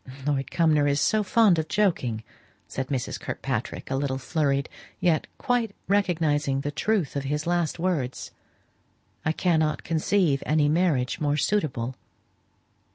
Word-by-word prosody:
"Lord 140 Hz, -2 st, 0 dB
Cumnor 155 Hz, -4 st, +3 dB
is 140 Hz, 0 st, +2 dB
so 215 Hz, +9 st, +2 dB
fond 205 Hz, -3 st, +4 dB
of 160 Hz, -, -2 dB
joking," 130 Hz, -, 0 dB, 0.4 s
said 130 Hz, -, -4 dB
Mrs. 130 Hz, -3 st, -3 dB
Kirkpatrick, -, -, -4 dB
a -, -, +1 dB
little 135 Hz, -1 st, -1 dB
flurried, 140 Hz, -1 st, 0 dB, 0.3 s
yet 165 Hz, -4 st, +2 dB
quite 240 Hz, -4 st, 0 dB
recognizing 155 Hz, -8 st, +1 dB
the 145 Hz, -, -3 dB
truth 190 Hz, 0 st, 0 dB
of 140 Hz, -1 st, -2 dB
his 150 Hz, +2 st, -2 dB
last 175 Hz, -2 st, 0 dB
words, 165 Hz, -8 st, -2 dB, 0.9 s
"I 160 Hz, -, +1 dB
cannot 160 Hz, -2 st, +1 dB
conceive 165 Hz, -3 st, +1 dB
any 155 Hz, -1 st, +2 dB
marriage 150 Hz, -5 st, +1 dB
more 145 Hz, -1 st, +1 dB
suitable." 140 Hz, -, 0 dB
155 Hz, 135 wpm, -26 LUFS, 140-175 Hz, 0.9 s, fond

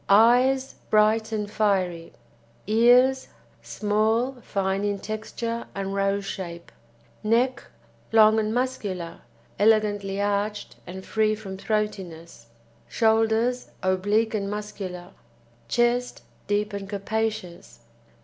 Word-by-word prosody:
EYES 250 Hz, +6 st, +4 dB, 0.2 s
Bright 215 Hz, +1 st, +3 dB
and 210 Hz, -2 st, -2 dB
fiery. 190 Hz, -5 st, 0 dB, 0.6 s
EARS 245 Hz, +4 st, +4 dB, 0.3 s
Small, 220 Hz, +5 st, 0 dB
fine 195 Hz, -1 st, -1 dB
in 205 Hz, -1 st, 0 dB
texture 225 Hz, +3 st, -5 dB
and 195 Hz, 0 st, -3 dB
rose 195 Hz, 0 st, 0 dB
shape. 170 Hz, -3 st, -7 dB, 0.5 s
NECK 240 Hz, +4 st, +1 dB, 0.5 s
Long 220 Hz, 0 st, +6 dB
and 215 Hz, 0 st, -1 dB
muscular, 210 Hz, -9 st, -3 dB, 0.4 s
elegantly 205 Hz, -2 st, +2 dB
arched 205 Hz, +1 st, -2 dB
and 190 Hz, +2 st, -8 dB
free 215 Hz, -1 st, +1 dB
from 200 Hz, -3 st, -8 dB
throatiness. 185 Hz, -, -4 dB, 0.4 s
SHOULDERS 225 Hz, +2 st, +1 dB
Oblique 205 Hz, +5 st, +1 dB
and 200 Hz, -2 st, -2 dB
muscular. 195 Hz, -4 st, -6 dB, 0.6 s
CHEST 240 Hz, -, 0 dB, 0.2 s
Deep 205 Hz, 0 st, 0 dB
and 200 Hz, -1 st, -5 dB
capacious. 205 Hz, -, -4 dB
210 Hz, 100 wpm, -25 LUFS, 195-225 Hz, 0.6 s, Long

